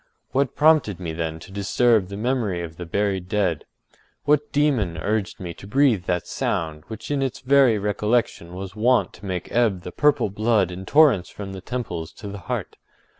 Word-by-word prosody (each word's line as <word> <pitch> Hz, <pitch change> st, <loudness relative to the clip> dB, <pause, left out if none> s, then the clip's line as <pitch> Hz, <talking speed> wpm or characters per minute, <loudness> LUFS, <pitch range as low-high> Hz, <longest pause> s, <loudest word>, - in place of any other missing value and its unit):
What 135 Hz, -1 st, 0 dB
prompted 150 Hz, -, +4 dB
me 85 Hz, -3 st, -4 dB
then 80 Hz, -1 st, -3 dB
to -, -, -12 dB
disturb 105 Hz, +1 st, +2 dB
the 100 Hz, +1 st, -7 dB
memory 110 Hz, -6 st, -1 dB
of 80 Hz, -1 st, -8 dB
the 90 Hz, -1 st, -7 dB
buried 95 Hz, 0 st, -1 dB
dead? 95 Hz, -7 st, 0 dB, 0.6 s
What 150 Hz, 0 st, +2 dB
demon 130 Hz, -, +1 dB
urged 105 Hz, +5 st, -2 dB
me 85 Hz, -2 st, -5 dB
to 100 Hz, -, -12 dB
breathe 125 Hz, -6 st, +3 dB
that 90 Hz, -1 st, -1 dB
sound, 80 Hz, -2 st, -2 dB
which 110 Hz, +5 st, -7 dB
in 140 Hz, -1 st, 0 dB
its 135 Hz, -2 st, -2 dB
very 135 Hz, -4 st, +5 dB
recollection 105 Hz, -3 st, -1 dB
was 95 Hz, +1 st, -7 dB
wont 120 Hz, +4 st, +2 dB
to -, -, -13 dB
make 90 Hz, -2 st, -4 dB
ebb 110 Hz, -7 st, +1 dB
the 90 Hz, -, -6 dB
purple 145 Hz, -6 st, +2 dB
blood 105 Hz, -3 st, +2 dB
in 95 Hz, +2 st, -8 dB
torrents 145 Hz, -, +5 dB
from 100 Hz, -2 st, -7 dB
the 95 Hz, -, -7 dB
temples 90 Hz, -8 st, -4 dB
to 105 Hz, -, -9 dB
the 100 Hz, 0 st, -7 dB
heart? -, -, -4 dB
105 Hz, 185 wpm, -23 LUFS, 90-125 Hz, 0.6 s, very